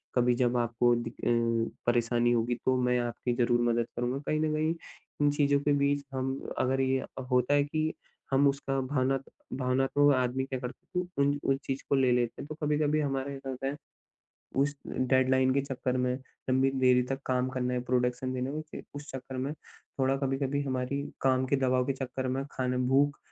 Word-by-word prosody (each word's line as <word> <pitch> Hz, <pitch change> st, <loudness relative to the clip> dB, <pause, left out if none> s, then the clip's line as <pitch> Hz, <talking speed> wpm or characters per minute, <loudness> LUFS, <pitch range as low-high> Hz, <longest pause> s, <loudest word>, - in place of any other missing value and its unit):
कभी 125 Hz, 0 st, +4 dB
जब 125 Hz, -1 st, +2 dB
आपको 120 Hz, 0 st, +2 dB
दि 120 Hz, 0 st, -3 dB
अ, 115 Hz, -1 st, -1 dB
परेशानी 120 Hz, 0 st, +2 dB
होगी 120 Hz, +1 st, +1 dB
तो 130 Hz, -, +3 dB
मैं 125 Hz, 0 st, +2 dB
आपकी 120 Hz, +1 st, -2 dB
ज़रूर 120 Hz, 0 st, +2 dB
मदद 115 Hz, 0 st, 0 dB
करूँगा। 125 Hz, +3 st, -1 dB
कहीं 155 Hz, -, +1 dB
न 155 Hz, 0 st, +1 dB
कहीं 155 Hz, +2 st, +1 dB, 0.5 s
इन 145 Hz, -, +5 dB
चीज़ों 145 Hz, -1 st, +3 dB
के 145 Hz, -, +1 dB
बीच 140 Hz, 0 st, +1 dB
हम 130 Hz, 0 st, -1 dB, 0.3 s
अगर 135 Hz, +1 st, +1 dB
ये 130 Hz, 0 st, +2 dB
अ, 130 Hz, -, -8 dB
होता 125 Hz, +2 st, +3 dB
है 145 Hz, 0 st, +4 dB
कि 155 Hz, +2 st, -1 dB, 0.4 s
हम 140 Hz, +1 st, +5 dB
उसका 135 Hz, -1 st, 0 dB
भावनात 135 Hz, 0 st, 0 dB, 0.3 s
भावनात्मक 135 Hz, +2 st, +3 dB
आदमी 130 Hz, +1 st, 0 dB
क्या 130 Hz, -1 st, -4 dB
करता 125 Hz, +1 st, -7 dB
है -, -, 0 dB
तो 180 Hz, -5 st, -4 dB
उन 140 Hz, +1 st, +2 dB, 0.2 s
उस -, -, -2 dB
चीज़ 135 Hz, 0 st, -3 dB
को -, -, +4 dB
ले 130 Hz, -2 st, +3 dB
लेते 120 Hz, -1 st, 0 dB
हैं, -, -, -8 dB
तो 155 Hz, -, -6 dB
कभी-कभी 150 Hz, 0 st, +2 dB
हमारे 135 Hz, -1 st, -2 dB
साथ 135 Hz, 0 st, -7 dB
होता 130 Hz, +1 st, -4 dB
है। 140 Hz, -, -2 dB, 0.8 s
उस 140 Hz, +1 st, +2 dB
डेडलाइन 130 Hz, 0 st, +2 dB
के 140 Hz, -, +3 dB
चक्कर 130 Hz, -2 st, -2 dB
में 125 Hz, 0 st, +1 dB, 0.4 s
लंबी 130 Hz, +1 st, +3 dB
देरी 125 Hz, -1 st, +5 dB
तक 135 Hz, 0 st, -1 dB
काम 130 Hz, 0 st, +1 dB
करना 125 Hz, -1 st, -1 dB
है, 125 Hz, -, 0 dB
प्रोडक्शन 125 Hz, +1 st, 0 dB
देना 130 Hz, +1 st, -2 dB
है। 150 Hz, +2 st, -3 dB
क्योंकि 155 Hz, -, -10 dB
उस 145 Hz, +1 st, -8 dB
चक्कर 130 Hz, 0 st, -6 dB
में 135 Hz, +3 st, -2 dB
थोड़ा 135 Hz, -3 st, -3 dB
कभी-कभी 135 Hz, +1 st, -1 dB
हमारी 130 Hz, +1 st, -2 dB, 0.2 s
काम 130 Hz, -1 st, +2 dB
के 140 Hz, +2 st, +2 dB
दबाव 130 Hz, -1 st, +2 dB
के 135 Hz, -, +1 dB
चक्कर 130 Hz, 0 st, -4 dB
में 135 Hz, +2 st, -1 dB
खाना 125 Hz, -1 st, -1 dB
भूख 145 Hz, +2 st, +3 dB
130 Hz, 200 wpm, -29 LUFS, 125-140 Hz, 0.8 s, इन